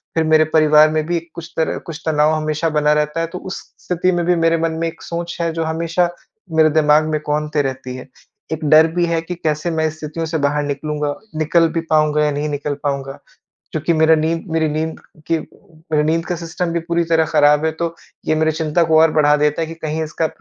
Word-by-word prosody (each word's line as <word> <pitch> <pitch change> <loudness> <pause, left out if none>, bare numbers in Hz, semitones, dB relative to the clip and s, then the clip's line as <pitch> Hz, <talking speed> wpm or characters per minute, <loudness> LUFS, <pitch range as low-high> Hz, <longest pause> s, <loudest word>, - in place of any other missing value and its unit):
फिर 165 - +2
मेरे 155 0 +4
परिवार 155 -1 +6
में 155 -1 0
भी 170 0 0
कुछ 170 -1 -9
तरह 160 - 0
कुछ 160 -1 -7
तनाव 155 0 +2
हमेशा 155 +1 -1
बना 150 -1 +2
रहता 150 +1 0
है, 165 - -1
तो 175 +2 -7
उस 190 - -6 0.3
स्थिति 180 +1 +1
में 175 -1 -1
भी 180 +1 +3
मेरे 165 0 +2
मन 165 0 0
में 165 - +1
एक 165 - -8
सोच 170 0 -5
है, 170 0 0
जो 165 0 -2
हमेशा 165 +2 0 0.4
मेरे 160 -1 +4
दिमाग 150 0 +3
में 155 -1 0
कौंधते 150 0 -1
रहती 130 -2 -4
है। 130 0 -9 0.5
एक 160 0 -4
डर 155 +1 +7
भी 175 -1 +2
है 165 -1 0
कि 180 +2 -6
कैसे 155 0 -2
मैं 160 -1 0
स्थितियों 155 +1 -5
से 160 0 -2
बाहर 145 0 0
निकलूँगा, 145 +1 -3 0.2
निकल 160 +2 +3
भी 165 - 0
पाउँगा 155 -1 +3
या 150 - +1
नहीं 145 +1 -2
निकल 145 0 -3
पाउँगा? 140 -1 -3 0.5
क्योंकि 155 +2 0
मेरा 160 0 +4
नींद 160 +1 -1
मेरी 160 -1 +1
नींद 160 +2 -3 0.3
की 165 -1 +1 0.5
मेरा 150 -1 +3
नींद 165 +2 0
का 180 - -2
सिस्टम 170 +1 -4
भी 170 - 0
पूरी 170 0 +1
तरह 160 -1 +4
खराब 150 -1 +3
है, 160 - +2
तो 165 +1 -3 0.3
ये - - +2
मेरी 160 0 +1
चिंता 160 +1 0
को 160 -1 +4
और 160 0 +5
बढ़ा 150 -1 +4
देता 150 +1 +1
है - - -1
कि 165 - -7
कहीं 160 -1 -3
इसका 160 +1 -2
155 Hz, 225 wpm, -19 LUFS, 150-165 Hz, 0.5 s, डर